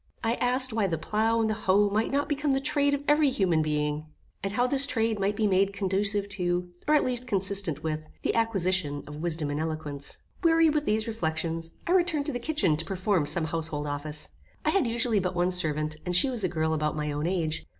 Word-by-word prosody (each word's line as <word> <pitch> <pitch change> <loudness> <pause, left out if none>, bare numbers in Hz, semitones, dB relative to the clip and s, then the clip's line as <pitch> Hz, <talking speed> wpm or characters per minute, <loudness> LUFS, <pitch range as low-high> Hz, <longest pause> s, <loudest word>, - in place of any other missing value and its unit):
I 225 0 +1
asked 255 0 +3
why 215 -3 +1
the 165 -3 -2
plough 220 +7 0
and 220 - +1
the 215 - 0
hoe 205 -1 +2
might 215 +2 0
not 285 +1 0
become 290 -1 0
the 270 - +1
trade 285 0 +1
of 285 - -7
every 295 -1 +4
human 185 -10 +1
being, 150 0 -2 0.3
and 195 - -3
how 245 +4 +1
this 275 +2 +6
trade 225 -5 0
might 200 +1 0
be 215 0 0
made 195 0 +2
conducive 200 +1 -1
to, 180 -2 -2 0.2
or, 305 - +4
at 300 - +3
least, 250 0 -1
consistent 195 - 0
with 155 -1 -3 0.2
the - - 0
acquisition 185 -10 0
of 150 0 -9
wisdom 160 -3 -1
and 145 - -3
eloquence. 155 -3 -4 0.3
Weary 330 -1 +4
with 300 0 -1
these 215 0 0
reflections, 165 -5 -3 0.2
I 345 - -2
returned 345 -5 +2
to 295 - -2
the 245 - -3
kitchen 235 - +1
to 160 - -2
perform 185 -3 0
some 160 +2 +3
household 160 -2 -3
office. 150 +1 0 0.4
I - - +3
had 390 -10 +1
usually 230 -2 +3
but 180 -1 -3
one 175 +1 +1
servant, 155 -3 0
and 180 -1 -1
she 265 +9 +5
was 235 -5 +5
a 185 - +1
girl 160 -1 -1
about 150 -1 -1
my 150 0 -2
own 145 +2 -2
age. 165 -4 -2
195 Hz, 225 wpm, -27 LUFS, 160-235 Hz, 0.4 s, this